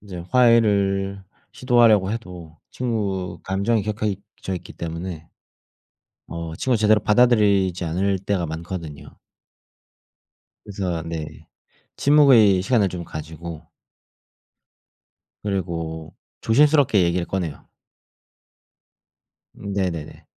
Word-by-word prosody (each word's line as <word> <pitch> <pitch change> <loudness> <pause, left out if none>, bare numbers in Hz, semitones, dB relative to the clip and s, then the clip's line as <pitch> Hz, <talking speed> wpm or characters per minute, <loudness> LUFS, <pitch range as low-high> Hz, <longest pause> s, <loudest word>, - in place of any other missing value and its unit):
이제 95 -4 -8
화해를 100 -5 +3 0.3
시도하려고 115 -6 +3
해도 90 -7 -8
친구 100 -8 -3
감정이 100 +4 0
격해있 105 -1 -3 0.2
져 95 - -3
있기 90 -1 -8
때문에 85 0 -6 1.0
어 85 -1 -6
친구가 130 -2 +1
제대로 110 0 +4
받아들이지 105 -6 +3
않을 95 +4 0
때가 95 -3 -1
많거든요. 80 -2 -7 1.5
그래서 95 -5 -3
네 80 -2 -7 0.5
침묵의 130 -10 +5
시간을 105 -1 +2
좀 90 -1 -6
가지고 80 +1 -8 1.8
그리고 85 -5 -4 0.3
조심스럽게 140 -3 +4
얘기를 85 0 0
꺼내요. 90 -6 -4 1.9
음 100 0 -7
네네네. 90 -6 -4
95 Hz, 230 characters per minute, -22 LUFS, 85-105 Hz, 1.9 s, 침묵의